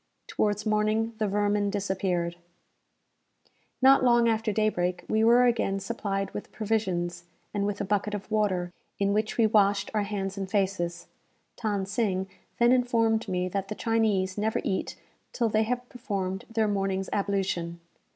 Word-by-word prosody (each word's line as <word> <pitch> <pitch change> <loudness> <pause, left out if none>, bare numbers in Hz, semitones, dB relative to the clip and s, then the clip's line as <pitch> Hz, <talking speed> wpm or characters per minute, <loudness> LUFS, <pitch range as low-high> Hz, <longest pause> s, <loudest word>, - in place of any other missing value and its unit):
Towards 210 0 -1
morning 215 +1 +1
the 215 - +1
vermin 205 0 +1
disappeared. 190 -4 -1 1.5
Not 270 0 +7
long 240 -1 +5
after 225 -1 +1
daybreak, 185 -4 0
we 220 0 +2
were 240 +2 +6
again 225 -5 +1
supplied 195 -1 -3
with - - -7
provisions, 180 -6 -2 0.3
and 200 -1 0
with 205 -1 -3
a - - -1
bucket 205 +1 0
of 205 +1 -8
water, 185 -5 0 0.2
in 200 0 +1
which 215 +1 -1
we 230 - +5
washed 205 -2 +3
our 215 - +2
hands 200 -1 -3
and 190 -1 -4
faces. 190 -4 -1 0.6
Than 205 -4 0
Sing 195 -2 -1 0.3
then 240 0 +5
informed 230 -3 +2
me 180 -1 -1
that 195 +1 -3
the 215 - -5
Chinese 210 -5 +1
never 220 +1 0
eat 190 - -2 0.3
till 235 -2 +1
they 215 0 +2
have 245 +2 -2
performed 200 -5 -4
their 225 -1 +1
morning's 195 -2 -1
ablution. 190 -4 -1
205 Hz, 150 wpm, -27 LUFS, 195-220 Hz, 1.5 s, Not